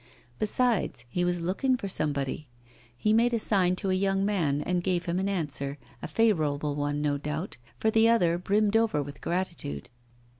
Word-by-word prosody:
Besides, 215 - 0
he 175 +8 -1
was 175 -1 0
looking 250 +10 +1
for 200 - -5
somebody; 145 -4 -2 0.5
he 215 - +2
made 235 +2 +3
a - - 0
sign 185 -4 +2
to 190 0 -2
a - - +2
young 195 +1 +1
man, 165 -9 +1
and 180 +1 -1
gave 180 -2 0
him 175 +1 -1
an 195 +1 0
answer, 145 -6 -2 0.2
a - - -4
favourable 155 -10 +1
one, 145 0 -1
no 145 -1 0
doubt, 150 +5 -4 0.2
for 220 - +2
the 225 +1 +5
other 175 -7 +3
brimmed 205 +3 +1
over 225 -10 +2
with 140 0 -10
gratitude. 170 - -3
180 Hz, 180 wpm, -28 LUFS, 150-205 Hz, 0.5 s, the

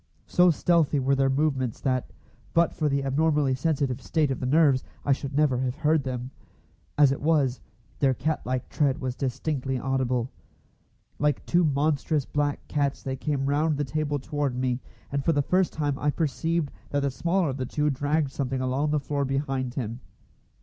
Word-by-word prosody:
So 180 0 +4
stealthy 160 -3 +2
were 135 +1 +2
their 135 0 +3
movements 135 -4 0
that, 130 -2 -1 0.4
but 170 0 +4
for 155 -2 0
the 140 0 0
abnormally 145 0 +2
sensitive 135 -2 0
state 155 -4 +1
of 130 - -2
the 125 - -2
nerves, 140 -2 +4 0.2
I 140 - +2
should 140 0 -1
never 145 -5 +3
have 130 -1 -1
heard 155 +1 +2
them. 130 -1 -4 0.7
As 145 -2 +6
it 135 - -3
was, 145 -5 +2 0.4
their 135 -2 +3
cat 155 +3 -1
like 130 0 -2
tread 140 -2 +1
was 130 -3 -2
distinctly 130 0 -2
audible. 130 -1 -1 0.9
Like 150 0 +1
two 175 +1 +3
monstrous 145 -1 +1
black 145 -1 -2
cats 140 -2 -1
they 130 -1 -2
came 135 0 -2
round 150 +2 +1
the 145 - 0
table 150 +1 -1
toward 140 -1 -2
me, 125 -1 0 0.3
and 140 0 -1
for 165 - +2
the 145 -1 +2
first 185 +4 +2
time 145 -3 -2
I 150 - +1
perceived 160 +1 -1 0.2
that 145 - 0
the 140 -1 0
smaller 170 +4 0
of 135 - -3
the 130 -2 -3
two 150 +2 0
dragged 145 +1 0
something 135 -2 -2
along 130 +3 0
the 150 0 +2
floor 140 0 -2
behind 135 -2 -2
him. 115 -1 -3
140 Hz, 185 wpm, -26 LUFS, 130-150 Hz, 0.9 s, As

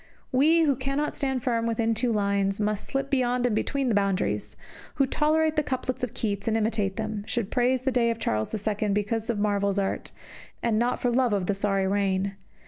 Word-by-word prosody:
We 310 +6 +4
who 285 -3 +3
cannot 275 +3 -2
stand 265 -4 -1
firm 230 -2 0
within 230 0 +1
two 235 +2 0
lines, 200 -2 +1
but 210 - 0
must 210 0 -1
slip 275 0 -2
beyond 250 -2 +1
and 245 - +1
between 275 +4 -1
the 235 - +2
boundaries, 200 -2 0 0.4
who 275 - +3
tolerate 310 +3 +1
the - - +5
couplets 255 -2 -3
of 250 - -3
Keats 200 -2 -2
and 225 0 +2
imitate 210 -3 0
them, 215 -2 -3
should 235 -5 -2
praise 255 0 +2
the 265 - +1
day 240 -2 +2
of 230 - -1
Charles 110 - -1
II 210 0 -1
because 210 +3 -1
of 235 - 0
Marvell's 200 -1 +1
art, 195 -1 -1 0.5
and 225 -2 +2
not 240 +1 +1
for 245 - +1
love 245 -2 +2
of 195 -3 0
the 205 - +1
sorry 195 -1 0
reign. 195 0 0
225 Hz, 210 wpm, -26 LUFS, 205-255 Hz, 0.5 s, the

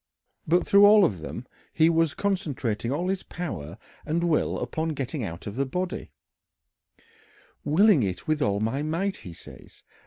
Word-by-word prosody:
But 175 +3 +3
through 200 0 +5
all 210 -1 +7
of 95 - -1
them 80 - -7 0.3
he 160 0 +3
was 165 -2 +2
concentrating 140 - -2
all 170 +6 -1
his 195 -1 -1
power 95 - -6 0.3
and 170 +3 -1
will 165 -3 +1
upon 160 0 -3
getting 135 0 -4
out 85 -4 -6
of 105 - -6
the 135 +2 0
body 180 +6 -4 1.5
"willing 185 +1 +4
it 95 - -3
with 155 -1 0
all 100 -5 +1
my 115 +6 -1
might," 170 +6 -2
he 90 - -10
says. - - -15
155 Hz, 160 wpm, -26 LUFS, 115-180 Hz, 1.5 s, all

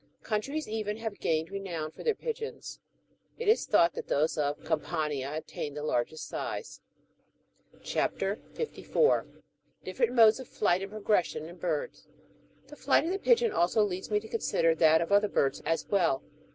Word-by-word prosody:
^ - - -34
Countries 275 +8 -2
even 215 -1 -3
have 220 -2 -5
gained 160 +2 0
renown 175 -6 -4
for - - -11
their 455 -2 +2
pigeons; 450 0 -6 0.6
it 465 - -4
is 440 - +3
thought 170 -5 +4
that - - -6
those 155 +3 +1
of 145 -1 -1
Campania 150 -4 -2
attain 150 -2 -5
the 150 - -5
largest 150 +2 -1
size. 455 - -5 1.0
CHAP. - - -1 0.4
54. 465 0 +1
(38.) - - -24 0.2
— - - -42
DIFFERENT 475 - 0
MODES 225 0 +7
OF 260 - -8
FLIGHT 185 -3 +1
AND 195 - -5
PROGRES 210 -4 +1
SION 155 - -6
IN 170 +2 -10
BIRDS. 165 -4 -3 0.6
The 290 +2 -12
flight 285 +1 +2
of 335 - -1
the 390 - -1
pigeon 470 0 +3
also 180 +5 +3
leads 185 -2 -3
me 210 -1 +2
to 220 - -11
consider 165 -7 +1
that 160 0 +5
of 170 - -3
other 205 +1 +4
birds 135 0 +1
as 165 - 0
well. 175 -9 +2
195 Hz, 180 wpm, -29 LUFS, 160-230 Hz, 1.0 s, MODES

